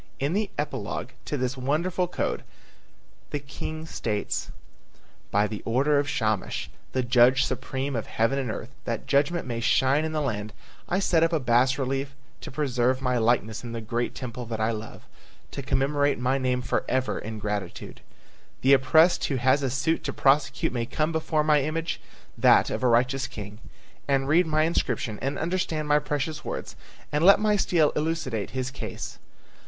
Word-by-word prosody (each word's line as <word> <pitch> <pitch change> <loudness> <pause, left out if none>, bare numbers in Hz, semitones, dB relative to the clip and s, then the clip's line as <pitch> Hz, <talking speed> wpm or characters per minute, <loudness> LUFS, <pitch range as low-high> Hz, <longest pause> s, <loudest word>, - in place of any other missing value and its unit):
In 140 +4 0
the 205 0 0
epilogue - - -3 0.2
to 145 - -2
this 130 0 -1
wonderful 165 +8 0
code - - -2 0.9
the - - -2
king 150 +3 -6
states: 105 -9 -3 0.8
"By 105 +1 +3
the 105 -1 -5
order 140 +5 +2
of 145 0 -1
Shamash, 110 -6 -1 0.2
the 130 - 0
judge 125 +2 +5
supreme 135 +1 -3
of 115 - -3
heaven 115 +5 +1
and 130 -3 -2
earth, 110 +3 -5
that 115 -1 -3
judgment 145 +5 +1
may 120 -2 -3
shine 135 +5 +3
in 160 - -2
the 155 - -1
land, 110 -7 -3 0.4
I 180 - +1
set 175 -4 +2
up 165 0 +3
a 160 - +2
bas 125 +1 +3
relief 135 +1 -2 0.3
to - - -7
preserve 130 -3 +1
my 125 -2 0
likeness 110 -1 +1
in 120 -1 -6
the 115 - -3
great 115 +2 -2
temple 125 -2 -6
that 110 -1 -4
I 110 +1 +1
love, 110 0 -7 0.5
to - - -5
commemorate 140 +1 +1
my 130 +2 +1
name 125 -1 0
forever 130 +2 -1
in 110 +1 -6
gratitude. 105 -3 -5 0.6
The 135 +2 +5
oppressed 160 +6 +5
who 140 - -1
has 130 +3 +3
a 135 - 0
suit 135 +6 0
to - - -1
prosecute 140 -1 +2
may 120 -2 -2
come 155 +5 0
before 160 -1 0
my 150 -1 +4
image, 160 +3 -2 0.3
that - - +5
of - - -2
a 130 - +3
righteous 130 +3 +2
king, 105 0 -8 0.5
and 135 -1 +1
read 165 +4 +4
my 155 0 +2
inscription 140 -8 -1
and 135 +2 -2
understand 165 -3 -1
my 150 0 +4
precious 150 +1 -3
words - - -5 0.4
and 150 +2 +1
let 195 +3 +8
my 210 0 +3
stele 170 -6 +3
elucidate 150 -9 -1
his 130 0 -3
case. - - -6
135 Hz, 175 wpm, -26 LUFS, 120-150 Hz, 0.9 s, let